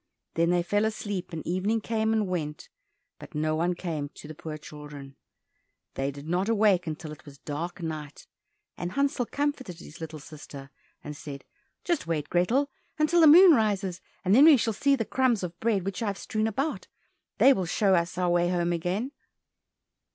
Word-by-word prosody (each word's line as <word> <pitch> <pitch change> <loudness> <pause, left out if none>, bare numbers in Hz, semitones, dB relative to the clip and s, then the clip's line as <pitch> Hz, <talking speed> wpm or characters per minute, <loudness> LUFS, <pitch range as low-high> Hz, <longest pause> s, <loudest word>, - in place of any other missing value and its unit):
Then 170 +1 +2
they 175 0 +2
fell 205 +4 +1
asleep 205 -4 -3
and 165 -2 -6
evening 195 +6 0
came 220 0 -1
and 215 -2 +1
went, 155 -5 -4 0.5
but 175 - -12
no 155 +1 0
one 175 +3 0
came 160 -5 -4
to - - -11
the 155 - -7
poor 155 0 -7
children. 150 -2 -10 0.8
They 135 +1 -1
did 140 +2 -9
not 180 +5 0
awake 205 -5 +3
until 155 0 -5
it 150 - -11
was 140 -2 -13
dark 165 +6 -5
night, 155 -3 -6 0.5
and 175 +1 -5
Hansel 280 -3 0
comforted 280 - -2
his 165 - -12
little 160 -1 -6
sister 145 -2 -11 0.3
and 150 0 -7
said, 140 -1 -9 0.4
"Just 340 - -1
wait, 150 -3 -2
Grethel, 250 +11 +2 0.3
until 310 +3 +3
the 320 - +8
moon 350 +4 +9
rises, 200 - +1 0.2
and 185 - +3
then 270 +7 +8
we 315 -3 +8
shall 225 -1 0
see 280 +6 +3
the 225 -4 -2
crumbs 250 -5 +1
of 170 -1 -6
bread 215 -5 0
which 195 +3 -3
I 225 - -1
have 200 -1 -2
strewn 215 0 -1
about, 270 +8 -2 0.5
they 275 - +7
will 190 -7 -2
show 195 +2 +2
us 175 0 +1
our 180 -1 +1
way 175 0 +2
home 175 -1 0
again." 185 +10 -2
180 Hz, 190 wpm, -27 LUFS, 155-220 Hz, 0.8 s, moon